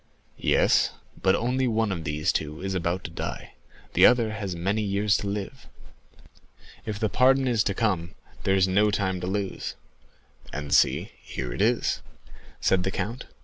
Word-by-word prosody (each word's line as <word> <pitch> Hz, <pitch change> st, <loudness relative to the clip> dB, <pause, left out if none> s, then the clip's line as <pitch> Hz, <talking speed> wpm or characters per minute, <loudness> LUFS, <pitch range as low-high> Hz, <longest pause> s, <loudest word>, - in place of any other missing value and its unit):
"Yes; -, -, +3 dB, 0.3 s
but 95 Hz, -, +4 dB
only 125 Hz, +2 st, 0 dB
one 110 Hz, -2 st, +1 dB
of 85 Hz, -4 st, -4 dB
these 75 Hz, 0 st, 0 dB
two 75 Hz, +1 st, -3 dB
is 95 Hz, 0 st, -2 dB
about 90 Hz, 0 st, -1 dB
to 85 Hz, -, -6 dB
die; -, -, -6 dB, 0.4 s
the -, -, +4 dB
other 120 Hz, -3 st, +6 dB
has 100 Hz, -4 st, -4 dB
many 95 Hz, +6 st, 0 dB
years 100 Hz, 0 st, +1 dB
to 100 Hz, -, -4 dB
live." 105 Hz, +6 st, -5 dB, 1.2 s
"If 105 Hz, -2 st, -2 dB
the 110 Hz, -, +1 dB
pardon 130 Hz, +5 st, +3 dB
is 115 Hz, -3 st, +2 dB
to 100 Hz, -, 0 dB
come, 95 Hz, -7 st, -1 dB, 0.3 s
there 95 Hz, -, +2 dB
is 95 Hz, -1 st, +4 dB
no 100 Hz, +3 st, +3 dB
time 95 Hz, -3 st, -1 dB
to 90 Hz, -, -3 dB
lose." 95 Hz, 0 st, -3 dB, 0.8 s
"And 75 Hz, -1 st, -4 dB
see, -, -, +3 dB
here 60 Hz, -2 st, -5 dB
it -, -, -3 dB
is," 115 Hz, +3 st, +1 dB, 0.6 s
said 95 Hz, -, +2 dB
the 95 Hz, -, -1 dB
count. 115 Hz, +5 st, -4 dB
100 Hz, 170 wpm, -26 LUFS, 90-110 Hz, 1.2 s, other